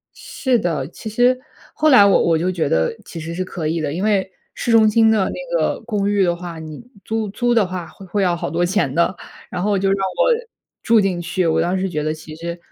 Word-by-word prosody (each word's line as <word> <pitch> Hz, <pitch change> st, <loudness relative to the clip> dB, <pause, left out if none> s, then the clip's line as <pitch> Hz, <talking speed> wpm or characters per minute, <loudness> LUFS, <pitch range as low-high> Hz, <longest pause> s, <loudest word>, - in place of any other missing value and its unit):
是 260 Hz, -3 st, -1 dB
的。 160 Hz, -9 st, -1 dB
其 200 Hz, -, -9 dB
实， 245 Hz, +4 st, +3 dB, 0.4 s
后 310 Hz, 0 st, +2 dB
来 230 Hz, -7 st, +8 dB
我 200 Hz, -, +4 dB
我 165 Hz, -1 st, +2 dB
就 175 Hz, +3 st, 0 dB
觉 170 Hz, -5 st, -1 dB
得 80 Hz, 0 st, +1 dB
其 170 Hz, -, -9 dB
实 165 Hz, +1 st, -6 dB
是 185 Hz, -, -2 dB
可 170 Hz, -4 st, -5 dB
以 165 Hz, +1 st, -1 dB
的， 145 Hz, -2 st, -2 dB
因 175 Hz, -, -3 dB
为 200 Hz, -3 st, +1 dB, 0.2 s
市 -, -, -3 dB
中 220 Hz, -1 st, +6 dB
心 220 Hz, +1 st, +4 dB
的 210 Hz, -3 st, +2 dB
那 -, -, -4 dB
个 -, -, 0 dB
公 210 Hz, -3 st, -1 dB
寓 205 Hz, -1 st, +2 dB
的 175 Hz, -2 st, +2 dB
话， 170 Hz, -1 st, -8 dB
你 155 Hz, +2 st, -9 dB, 0.2 s
租 220 Hz, -1 st, -2 dB
租 240 Hz, +3 st, 0 dB
的 215 Hz, -5 st, +3 dB
话 180 Hz, -2 st, -5 dB
会 195 Hz, -, -14 dB
会 200 Hz, +2 st, -1 dB
要 175 Hz, -2 st, +2 dB
好 165 Hz, -, -4 dB
多 170 Hz, +3 st, 0 dB
钱 175 Hz, -7 st, 0 dB
的。 170 Hz, +4 st, +1 dB, 0.3 s
然 180 Hz, -1 st, -3 dB
后 205 Hz, -1 st, +1 dB
就 195 Hz, 0 st, +1 dB
让 195 Hz, -, +2 dB
我 190 Hz, -, +1 dB, 0.5 s
住 230 Hz, -1 st, +4 dB
进 190 Hz, -3 st, 0 dB
去， 175 Hz, +1 st, -1 dB
我 160 Hz, 0 st, +2 dB
当 180 Hz, +3 st, 0 dB
时 190 Hz, -, -1 dB
觉 155 Hz, -4 st, -3 dB
得 155 Hz, +1 st, -1 dB
其 155 Hz, 0 st, -11 dB
实 170 Hz, +1 st, -6 dB
185 Hz, 265 characters per minute, -20 LUFS, 170-210 Hz, 0.5 s, 来